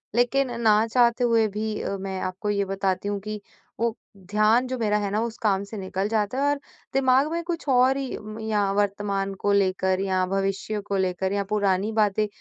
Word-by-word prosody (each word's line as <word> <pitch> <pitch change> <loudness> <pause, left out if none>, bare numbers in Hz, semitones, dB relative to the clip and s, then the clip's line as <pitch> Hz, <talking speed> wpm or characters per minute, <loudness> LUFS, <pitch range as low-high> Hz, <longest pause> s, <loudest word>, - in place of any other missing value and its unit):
लेकिन 250 +2 +2 0.2
न 215 +1 +5
चाहते 240 0 +4
हुए 230 -2 +3
भी 215 +1 -3
अ, 200 - -3
मैं 190 0 -4
आपको 190 +3 -3
ये 200 -1 +1
बताती 195 0 -1
हूँ 205 -1 -2
कि 210 +1 -6 0.4
वो 230 -1 0 0.2
ध्यान 215 +6 +2
जो 255 0 -3
मेरा 210 -2 +2
है 205 -1 -1
ना, 210 - +1
उस 230 -1 -3
काम 200 -3 +1
से 205 +2 -8
निकल 190 0 -2
जाता 215 +2 0
है। 275 - +1
और 290 - -1 0.3
दिमाग 265 +2 +3
में 340 +1 -2
कुछ 335 -3 -3
और 260 +1 +4
ही 270 -2 -4
म 215 +1 -9
या 210 -3 0
वर्तमान 200 -1 -1
को 205 - +3
लेकर 190 -1 +2
या 185 -1 +1
भविष्य 195 +2 -1
को 200 - 0
लेकर 190 0 -1
या 200 0 0
पुरानी 205 0 +1
बातें 215 -1 +2
210 Hz, 205 wpm, -25 LUFS, 195-230 Hz, 0.4 s, न